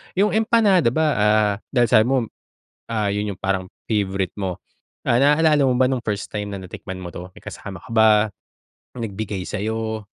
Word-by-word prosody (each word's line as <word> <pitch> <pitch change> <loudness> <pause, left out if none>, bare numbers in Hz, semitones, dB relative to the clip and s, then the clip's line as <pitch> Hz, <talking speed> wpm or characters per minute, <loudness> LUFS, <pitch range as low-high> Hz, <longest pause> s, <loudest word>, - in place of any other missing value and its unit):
'Yong 205 +3 +3
empanada 215 - +3
ba, 160 +2 +2
ah, 105 0 +3
dahil 120 -3 +2
sabi 110 - +6
mo, 135 - +2 0.7
ah, 110 -3 0
'yon 105 0 -2
'yong - - -18
parang 95 -1 0 0.2
favorite 100 -4 0
mo, 95 -3 -4 0.5
ah, 120 - +4
naalala 150 +2 +4
mo 130 - +3
ba 130 0 +3
nung 130 -2 -1
first 105 -1 -3
time 105 -1 -4
na 100 - -5
natikman 95 0 -8
mo 90 - -6
to, 90 +1 -8
may - - -15
kasama 100 0 -8
ka 125 - -16
ba, 110 -1 +5 0.9
may 120 - -3
nagbigay 100 -1 -4
sa'yo? 110 +1 -3
110 Hz, 185 wpm, -22 LUFS, 100-130 Hz, 0.9 s, sabi